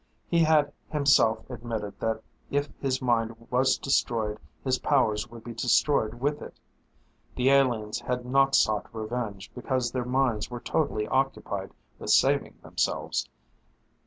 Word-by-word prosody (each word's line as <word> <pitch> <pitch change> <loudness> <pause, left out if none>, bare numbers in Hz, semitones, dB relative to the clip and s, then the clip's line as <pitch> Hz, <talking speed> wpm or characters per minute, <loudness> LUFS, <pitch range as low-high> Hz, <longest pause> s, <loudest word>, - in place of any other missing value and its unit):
He 170 - +2
had 150 -2 +3 0.2
himself 140 -7 +3
admitted 115 -4 -5
that 110 0 -2 0.3
if 145 +1 0
his 130 -1 -1
mind 115 -2 +1 0.2
was 130 +1 +3
destroyed 110 -6 0 0.2
his 130 -2 +1
powers 110 -7 +1
would 115 -1 -11
be 120 - -7
destroyed 120 0 +2
with 145 +4 -1
it. - - -10 0.8
The 130 +2 +3
aliens 120 -5 +2
had 125 0 -3
not 135 +2 +3
sought 110 -1 +2
revenge 110 -3 -4
because 125 0 -1
their 125 -1 -2
minds 125 -3 0
were 120 -1 -5
totally 115 -6 -1
occupied 130 -7 -1 0.3
with - - -6
saving - - +3
themselves. - - -1
125 Hz, 135 wpm, -27 LUFS, 110-135 Hz, 0.8 s, had